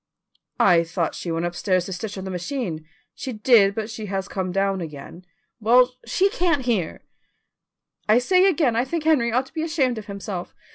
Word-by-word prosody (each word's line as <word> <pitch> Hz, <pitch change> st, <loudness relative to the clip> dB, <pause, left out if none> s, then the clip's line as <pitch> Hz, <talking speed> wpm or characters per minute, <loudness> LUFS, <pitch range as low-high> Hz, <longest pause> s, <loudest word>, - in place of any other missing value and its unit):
"I 175 Hz, -3 st, +5 dB
thought 170 Hz, 0 st, -2 dB
she 170 Hz, -, -5 dB
went 165 Hz, +1 st, -1 dB
upstairs 180 Hz, +1 st, 0 dB
to 190 Hz, -, -5 dB
stitch 200 Hz, +3 st, -6 dB
on 190 Hz, -, -5 dB
the 190 Hz, -, -5 dB
machine." 175 Hz, -, -4 dB, 0.3 s
"She 260 Hz, -, -6 dB
did, 210 Hz, -3 st, +4 dB
but 220 Hz, -1 st, -3 dB
she 220 Hz, -1 st, -7 dB
has 195 Hz, 0 st, -3 dB
come 185 Hz, -2 st, -3 dB
down 195 Hz, 0 st, 0 dB
again." 160 Hz, +3 st, -9 dB, 0.3 s
"Well, 245 Hz, +3 st, +4 dB
she 390 Hz, +2 st, +2 dB
can't 345 Hz, -, 0 dB
hear." 210 Hz, -10 st, -1 dB, 1.1 s
"I 215 Hz, -, +6 dB
say 365 Hz, +9 st, +4 dB
again 305 Hz, -11 st, +2 dB
I 235 Hz, -, +2 dB
think 315 Hz, +4 st, -3 dB
Henry 285 Hz, -7 st, +3 dB
ought 255 Hz, +3 st, +1 dB
to -, -, -19 dB
be 320 Hz, -, -3 dB
ashamed 270 Hz, -7 st, 0 dB
of 210 Hz, -, -11 dB
himself. 200 Hz, -2 st, -6 dB
210 Hz, 190 wpm, -23 LUFS, 185-255 Hz, 1.1 s, I